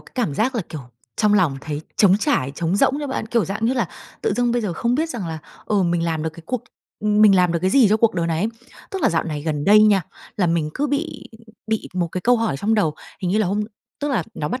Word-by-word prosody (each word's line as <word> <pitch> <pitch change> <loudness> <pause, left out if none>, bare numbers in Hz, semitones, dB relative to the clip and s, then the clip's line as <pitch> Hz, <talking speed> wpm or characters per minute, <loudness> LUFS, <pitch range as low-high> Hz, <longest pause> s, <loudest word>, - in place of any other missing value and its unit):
cái - - -19
cảm 230 - -1
giác 250 - 0
là, 225 - 0
kiểu, 155 - -6 0.4
trong 210 -1 +3
lòng 170 -9 +2
thấy 150 +1 -4 0.2
trống 195 -2 +5
trải, 140 - 0
trống 170 +6 -1
rỗng 260 - +3
chưa 290 - -3
bạn? 265 - -3
Kiểu, 230 -3 +1
dạng 205 +5 -3
như 250 - +2
là 245 - 0 0.3
tự 445 - +1
dưng 245 -1 +2
bây 240 -1 0
giờ 200 -5 -2
không 235 +8 0
biết 315 +5 0
rằng 235 - -4
là, 160 -1 -4 0.3
ừ, 205 -3 +2
mình 170 -1 +1
làm 160 -2 -1
được 160 - -2
cái 165 +2 -13
cuộc 250 -2 -2 0.4
ừm, 210 0 +3
mình 205 -2 +7
làm 180 -2 +3
được 170 - +1
cái 185 - +2
gì 250 -5 +5
cho 215 - +4
cuộc 225 -2 +2
đời 170 -2 0
này 165 -1 -1
ấy. 205 +6 +1 0.4
Tức 385 -2 -4
là - - +5
dạo 165 - +1
này 150 -3 -4
gần 150 -2 -2
đây 210 +1 +7
nha, 205 -3 +4 0.3
là 190 -5 +2
mình 165 -2 0
cứ 290 - 0
bị 290 +3 -3 0.4
bị 220 -1 -2
một 175 -2 0
cái 185 - -2
câu 245 +6 +4
hỏi 225 -10 -1
trong 215 +9 +1
đầu. 165 -8 +1 0.3
Hình 180 - 0
như 205 - +2
là 215 - +2
hôm 205 +3 0 0.4
tức 290 - -1
là 230 -10 +1
nó 150 - -3
bắt 250 - -3
205 Hz, 285 wpm, -21 LUFS, 170-235 Hz, 0.4 s, mình